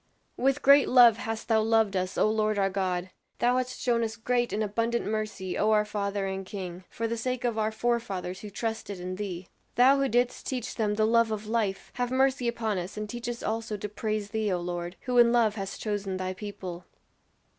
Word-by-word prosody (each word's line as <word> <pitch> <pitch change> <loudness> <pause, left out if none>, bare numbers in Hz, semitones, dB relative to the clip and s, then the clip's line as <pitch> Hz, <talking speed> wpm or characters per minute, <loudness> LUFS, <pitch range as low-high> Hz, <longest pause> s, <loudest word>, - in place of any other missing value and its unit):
"With 270 +2 +1
great 280 0 +7
love 240 -3 +7
hast 225 0 -4
thou 220 -2 +3
loved 220 -2 +2
us, 185 0 -2
O - - +4
Lord 215 -1 +1
our 195 -1 +2
God; 185 -1 -2 0.3
thou 245 +1 +2
hast 255 0 -2
shown 235 -2 +1
us 225 0 -3
great 240 +1 0
and 215 - 0
abundant 230 +3 -1
mercy, 215 -3 -3
O 215 - +3
our 210 -1 +4
Father 200 -1 -2
and 190 0 -3
King, 185 -2 -7
for 230 - -3
the 230 - -2
sake 255 +2 -2
of 230 -2 0
our 215 0 +1
forefathers 220 -6 -2
who 210 - -8
trusted 220 -2 -4
in 185 +1 -5
thee! 185 -3 -5 0.3
Thou 265 +3 +6
who 275 -1 +1
didst 245 +2 0
teach 250 -3 -3
them 210 -2 0
the 215 0 +2
love 230 0 +4
of 215 -1 -3
life; 215 -3 -1
have 245 -1 0
mercy 260 -1 +2
upon 225 -4 -1
us 180 +4 -6
and 215 0 -3
teach 240 +2 -5
us 240 0 -5
also 225 -1 -2
to 205 - -4
praise 210 0 -3
thee, 220 -2 0
O 180 - 0
Lord, 175 0 -4
who 250 -1 +1
in 235 -1 +7
love 230 -3 +3
hast 195 -2 -5
chosen 205 -3 -2
thy 185 0 -3
people!" 185 -3 -7
215 Hz, 215 wpm, -28 LUFS, 195-235 Hz, 0.3 s, great